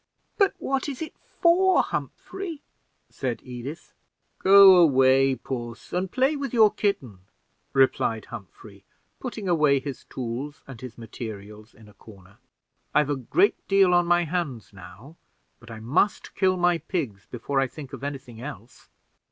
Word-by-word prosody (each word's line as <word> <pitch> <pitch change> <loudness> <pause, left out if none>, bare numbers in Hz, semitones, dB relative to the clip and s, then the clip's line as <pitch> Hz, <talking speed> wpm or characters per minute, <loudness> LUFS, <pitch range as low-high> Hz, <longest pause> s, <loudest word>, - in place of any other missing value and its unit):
"But 395 -2 +2
what 270 +1 -2
is 270 - -6
it 315 - -8 0.3
for, 365 +2 +4
Humphrey?" 345 -6 -6 0.5
said 125 -3 -3
Edith. 125 +7 -8 0.5
"Go 195 -1 +8
away, 135 -4 +4
puss, 120 -2 -7
and 180 +1 -2
play 265 +4 +2
with 275 -4 -4
your 220 -3 +5
kitten," 140 - -2 0.5
replied 130 -4 +1
Humphrey, 100 -2 -12 0.4
putting 230 -6 -6
away 150 -5 +3
his 135 -1 -7
tools 130 +4 -6
and 130 -4 -11
his 125 -3 -9
materials 110 -2 -9
in 110 -1 -17
a 105 - -17
corner; 100 -1 -17 0.6
"I've 150 -1 +3
a - - +1
great 355 - +1
deal 195 -2 +4
on 175 -1 +3
my 175 0 +3
hands 150 - -4
now, 95 - -13 0.4
but 120 - -16
I 115 -1 -8
must 140 - 0
kill 185 -1 +1
my 175 -1 +2
pigs 130 - -4
before 130 +3 -2
I 135 - +1
think 140 0 -11
of - - -8
any 140 0 -3
thing 120 -4 -14
else." 125 -4 -10
140 Hz, 150 wpm, -25 LUFS, 115-185 Hz, 0.6 s, Go